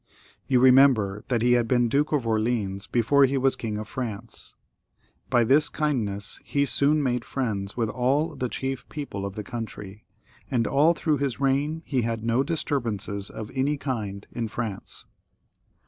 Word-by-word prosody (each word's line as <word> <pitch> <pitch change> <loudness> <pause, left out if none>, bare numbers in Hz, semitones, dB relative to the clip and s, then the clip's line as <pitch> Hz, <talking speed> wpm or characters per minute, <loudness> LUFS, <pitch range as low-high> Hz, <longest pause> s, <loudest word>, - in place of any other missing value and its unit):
You 130 -2 +3
remember 125 -6 +5
that 120 -3 0
he 120 - +4
had 120 -1 +3
been 120 -1 +3
Duke 145 +6 +1
of 145 -6 +1
Orleans 110 -3 -1
before 135 +4 +4
he 135 +1 0
was 135 0 +2
King 110 -2 -4
of 110 0 -5
France. 115 -2 -6 0.7
By 120 -3 +4
this 145 +6 +4
kindness 110 -10 -2
he 140 0 0
soon 145 +2 +2
made 125 -2 0
friends 105 -8 -3
with 115 -2 +1
all 130 +7 0
the 125 - -2
chief 135 +1 -4
people 100 -10 -5
of 100 - -9
the 105 - -4
country, 105 -2 -7 0.5
and 120 -3 +1
all 150 +8 +4
through 155 -3 0
his 140 -3 -2
reign 140 +4 0
he 130 -4 0
had 115 -1 -2
no 115 +3 +2
disturbances 115 - -2
of 110 -1 -7
any 140 +2 0
kind 110 -8 -4
in 115 -2 -3
France. 110 -3 -5
125 Hz, 165 wpm, -26 LUFS, 110-140 Hz, 0.7 s, remember